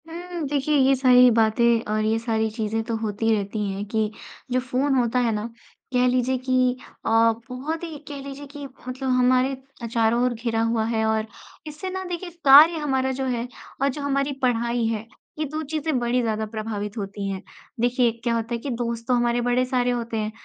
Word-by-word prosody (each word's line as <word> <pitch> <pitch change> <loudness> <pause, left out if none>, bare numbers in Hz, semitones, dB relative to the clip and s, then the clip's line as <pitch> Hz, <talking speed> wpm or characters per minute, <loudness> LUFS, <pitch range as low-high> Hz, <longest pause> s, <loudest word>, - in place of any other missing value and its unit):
हुँ, 345 -1 -5
देखिए, 290 +1 +1
ये 270 0 +4
सारी 250 -1 +6
बातें 230 +1 +3
और 215 0 +1
ये 220 +1 +2
सारी 220 -1 0
चीज़ें 220 0 -2
तो 230 0 -3
होती 220 0 -3
ही 225 - +4
रहती 205 +1 -3
हैं 195 +1 -4
कि 220 0 0 0.4
जो 255 - +2
फ़ोन 260 +2 0
होता 245 0 +2
है 240 -2 +2
ना, 210 0 -2 0.5
कह 250 0 +3
लीजिए 255 +1 +1
कि 255 0 +1 0.3
अ, - - 0 0.4
बहुत 295 +7 -4
ही, 325 -3 -6
कह 285 -1 -6
लीजिए 280 +1 -8
कि 290 -1 -7 0.2
मतलब 260 +1 -3
हमारे 255 +1 +3 0.3
अ, - - -4
चारों 230 +1 +2
ओर 250 -1 +1
घिरा 225 -1 -1
हुआ 230 -1 +1
है, 220 -1 0
और 220 0 +1 0.4
इससे 305 +5 -6
ना 375 0 -4
देखिए 355 0 -5 0.2
कार्य 300 +5 +9
हमारा 265 -3 0
जो 265 - 0
है 245 -2 -2 0.3
और 275 - +3
जो 285 +2 -5
हमारी 275 0 0
पढ़ाई 235 -1 +1
है, 225 -1 -2 0.3
ये 310 - 0
2 305 +2 -4
चीज़ें 310 -1 -1
बड़ी 240 +1 +1
ज़्यादा 220 -2 -1
प्रभावित 215 -1 -5
होती 200 -1 -4
हैं। 190 -1 -4 0.4
देखिए, 245 0 +2
क्या 235 -1 +1
होता 230 +1 -2
है - - 0
कि 280 - -5
दोस्त 235 -1 -3
तो 255 - +2
हमारे 240 0 +2
बड़े 245 +1 +2
सारे 250 -1 +1
होते 235 -2 -3
हैं, 215 0 -2
245 Hz, 205 wpm, -24 LUFS, 225-270 Hz, 0.5 s, कार्य